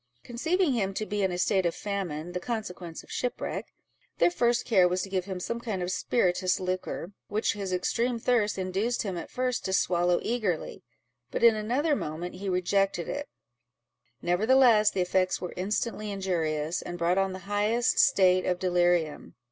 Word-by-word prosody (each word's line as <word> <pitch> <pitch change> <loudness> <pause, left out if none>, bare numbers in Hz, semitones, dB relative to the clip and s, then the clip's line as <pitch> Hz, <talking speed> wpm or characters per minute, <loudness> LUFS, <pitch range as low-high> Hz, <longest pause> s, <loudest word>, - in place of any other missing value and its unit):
Conceiving 320 +6 0
him 195 -5 -1
to 215 - -2
be 205 0 -2
in 190 -1 +1
a 175 - -3
state 190 +1 +2
of 170 - -2
famine, 175 -5 -4
the 180 - -3
consequence 180 -6 -5
of - - -16
shipwreck, 250 - -3 0.5
their - - +4
first 240 -6 +1
care 190 -6 +5
was 180 +1 -1
to 195 - -6
give 185 -2 -1
him 190 -2 -5
some 235 +6 -3
kind 215 -6 -3
of 180 - -2
spirituous 185 -4 +1
liquor, 185 -1 -3 0.2
which 210 +2 0
his 200 -2 -4
extreme 230 +7 0
thirst 225 -3 +1
induced 195 +6 -1
him 195 -4 -3
at 170 - -6
first 255 -1 -1
to 190 - -2
swallow 175 -1 +2
eagerly, 215 -8 -2 0.5
but - - -3
in 230 -1 +7
another 255 +9 +1
moment 170 - -4
he 195 0 -5
rejected 185 0 +1
it; 290 0 -4 0.9
nevertheless, 215 +4 +5
the 190 - -1
effects 185 +1 +1
were 180 - -5
instantly 210 +3 -2
injurious, 170 -5 -1
and 175 - -6
brought 175 +2 +2
on 195 0 +1
the 185 - -5
highest 210 +4 +1
state 185 -10 +5
of 180 - 0
delirium. 175 -3 +1
195 Hz, 175 wpm, -28 LUFS, 180-225 Hz, 0.9 s, in